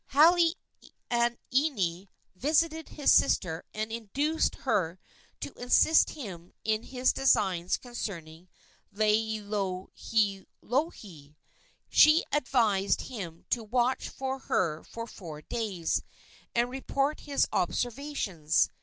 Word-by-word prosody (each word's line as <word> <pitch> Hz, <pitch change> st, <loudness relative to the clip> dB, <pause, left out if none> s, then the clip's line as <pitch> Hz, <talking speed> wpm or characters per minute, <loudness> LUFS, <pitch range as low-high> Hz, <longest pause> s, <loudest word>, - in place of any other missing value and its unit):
Halaaniani 260 Hz, -, +1 dB, 0.3 s
visited 320 Hz, -, +1 dB
his 290 Hz, -, +2 dB
sister 165 Hz, -3 st, +3 dB
and 215 Hz, +1 st, -4 dB
induced 275 Hz, +8 st, 0 dB
her 180 Hz, -8 st, +1 dB, 0.4 s
to -, -, -5 dB
assist 250 Hz, +6 st, +5 dB
him 185 Hz, -, -8 dB
in 215 Hz, 0 st, +1 dB
his 255 Hz, +1 st, 0 dB
designs 190 Hz, -9 st, +2 dB
concerning 175 Hz, -9 st, -7 dB, 0.5 s
Laielohelohe. 210 Hz, -, -1 dB, 0.5 s
She 310 Hz, +2 st, +6 dB
advised 230 Hz, -9 st, +2 dB
him 180 Hz, -10 st, -7 dB
to 235 Hz, -, +1 dB
watch 245 Hz, +3 st, 0 dB
her 260 Hz, -12 st, -1 dB
for 230 Hz, 0 st, -7 dB
four 160 Hz, -9 st, -10 dB
days, 200 Hz, -7 st, -2 dB, 0.5 s
and 240 Hz, +1 st, +2 dB
report 275 Hz, +2 st, -1 dB
his 285 Hz, -2 st, 0 dB
observations. 220 Hz, -, 0 dB
225 Hz, 90 wpm, -29 LUFS, 185-270 Hz, 0.5 s, She